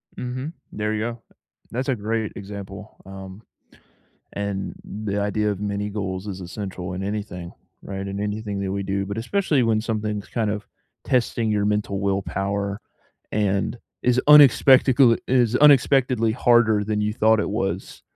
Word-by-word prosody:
Mhm. 130 +5 -5 0.2
There 105 0 -2
you 110 - -1
go. 115 +1 -4 0.5
That's 130 +4 -2
a 130 - +2
great 110 0 -2
example, 100 +1 -9
um, 95 +1 -10 0.9
and 100 -2 -3
the 105 -1 -4
idea 105 +1 0
of 100 -1 -4
many 105 0 -2
goals 95 -2 -4
is 95 -1 -5
essential 90 0 -6
in 95 - -4
anything, 100 -4 -5 0.3
right, 95 0 -5
in 100 +1 -4
anything 105 -1 -3
that 95 - -2
we 100 0 -2
do, 100 0 -1
but 100 +2 -4
especially 150 - +1
when 110 -1 +2
something's 105 -2 -3
kind 110 -3 -1
of 105 0 -4 0.4
testing 115 -2 +1
your 105 -1 +1
mental 105 -1 0
willpower 100 +1 -2 0.5
and 100 +2 0 0.2
is 125 0 +3
unexpectacle 135 -3 +7
it - - -8
is 125 -2 +3
unexpectedly 135 -4 +4
harder 110 -3 +3
than 105 0 -1
you 105 0 0
thought 110 0 +3
it - - -2
was. 100 -1 -3
105 Hz, 155 wpm, -23 LUFS, 100-115 Hz, 0.9 s, unexpectacle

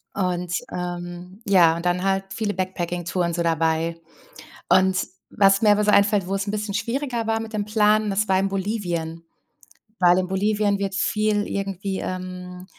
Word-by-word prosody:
Und, 180 -2 -1 0.2
ähm, 175 +2 -6
ja, 175 -5 +5
und 170 +1 -6
dann 180 +1 +1
halt 195 0 +1
viele 215 -2 -2
Backpacking-Touren 175 -1 -2
so 170 0 -1
dabei. 165 0 0 0.7
Und 190 0 +3 0.2
was 195 -1 +4
mir 210 -1 +5
einfällt, 205 -2 +3
wo 195 - -1
es 195 +1 -3
'n 200 - -1
bisschen 210 -1 -3
schwieriger 235 +1 -2
war 225 0 +1
mit 225 0 -7
dem 205 -1 -1
Plan, 215 0 +3
das 205 +2 0
war 190 0 +3
in 195 - +1
Bolivien. 175 -5 -3 0.8
Weil 180 0 +5
in 185 -1 0
Bolivien 205 +1 +1
wird 195 -1 -2
viel 210 0 +1
irgendwie, 195 -1 -3
ähm 180 0 -6
190 Hz, 160 wpm, -23 LUFS, 180-205 Hz, 0.8 s, ja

